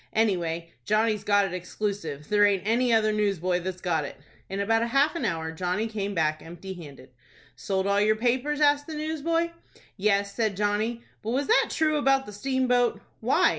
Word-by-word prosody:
"Anyway, 170 -6 0
Johnny's 215 - +1
got 205 -1 +3
it 190 - -5
exclusive. 180 -5 -4
There 205 0 +3
aint 200 -3 +3
any 240 +3 +2
other 220 -1 +4
newsboy 195 -4 0
that's 185 0 -5
got 165 -4 0
it." 145 - -7 0.3
In 195 - -3
about 225 +3 +1
half 280 +5 +3
an 335 - -2
hour 160 -3 -2
Johnny 180 +5 -1
came 205 -2 -3
back 155 -2 +1
empty 175 +3 -8
handed. 140 -7 -12 0.4
"Sold 190 -1 -2
all 200 0 +2
your 215 +1 +3
papers?" 255 +6 0
asked 290 0 +3
the 320 - -5
newsboy. 320 +2 -1 0.5
"Yes," 200 0 +1
said 215 -4 -1
Johnny; 215 +3 0 0.2
"but 215 - -5
was 265 +4 0
that 455 - +4
true 310 -1 +1
about 270 -2 +3
the 210 - -9
steamboat?" 250 +1 +1 0.2
"Why?" - - +3
210 Hz, 180 wpm, -26 LUFS, 185-245 Hz, 0.5 s, other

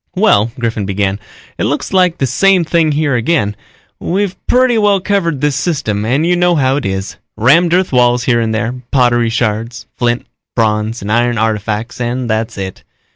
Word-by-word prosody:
"Well," 150 - +3
Griffin 115 -4 -2
began, 100 0 -1 0.4
"it - - 0
looks - - -2
like 180 -2 +3
the 135 - 0
same 185 - +3
thing 160 -2 +1
here 145 -1 0
again. 120 -4 0 0.4
We've 190 +1 -1
pretty 250 -2 +3
well 205 -2 +3
covered 180 -7 -1
this 150 -2 +1
system 110 - -1
and 135 +8 +1
you 180 +1 +2
know 175 0 +2
how 135 -2 +2
it 145 - -2
is. 95 0 -4 0.2
Rammed 165 +10 +4
earth 185 -5 0
walls 125 -1 +3
here 120 -2 +2
and 110 -1 -1
there, 115 +2 -1 0.2
pottery 120 -3 +2
shards, 115 0 -2
flint, 120 0 -1 0.3
bronze 110 -1 0
and 105 - -3
iron 120 +1 +1
artifacts 110 +2 -2
and 120 +1 -2
that's 110 -1 -2
it. 95 -1 -6
120 Hz, 180 wpm, -14 LUFS, 110-170 Hz, 0.4 s, Rammed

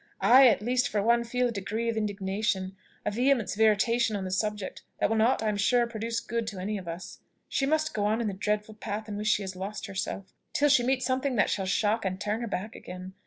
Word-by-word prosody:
I, 260 +2 +8
at 215 -3 +3
least, 250 +3 +2
for 205 -2 0
one, 235 +2 +3
feel 245 +1 0
a - - -3
degree 220 +2 -3
of 230 - 0
indignation 195 -2 -1 0.3
a - - +1
vehemence 245 0 +2
of 215 - -3
irritation 220 +1 +3
on 200 - -3
the 185 - -4
subject, 210 0 -2 0.2
that - - +2
will - - +2
not, 225 +1 +3
I 215 - +1
am 210 - -1
sure, 240 +4 +3
produce 230 0 -3
good 230 0 -3
to 205 -4 -5
any 205 +2 -2
of 180 - -11
us. 170 +2 -7 0.3
She 270 - 0
must 310 +1 +1
go 205 -1 0
on 215 +2 +1
in 235 - -1
the 200 - -2
dreadful 210 +2 -2
path 210 0 -5
in 210 - -5
which 210 +1 -3
she 210 -1 +2
has 190 -1 -6
lost 195 +4 -5
herself, 195 -1 -5 0.2
till 290 0 +3
she 275 -3 +5
meet 255 +1 +1
something 260 +1 0
that 205 - +2
shall 195 -2 -1
shock 215 +3 +1
and 185 -1 -2
turn 210 +3 -2
her 235 - -3
back 210 +1 -4
again. 185 +1 -9
215 Hz, 250 wpm, -28 LUFS, 200-235 Hz, 0.3 s, I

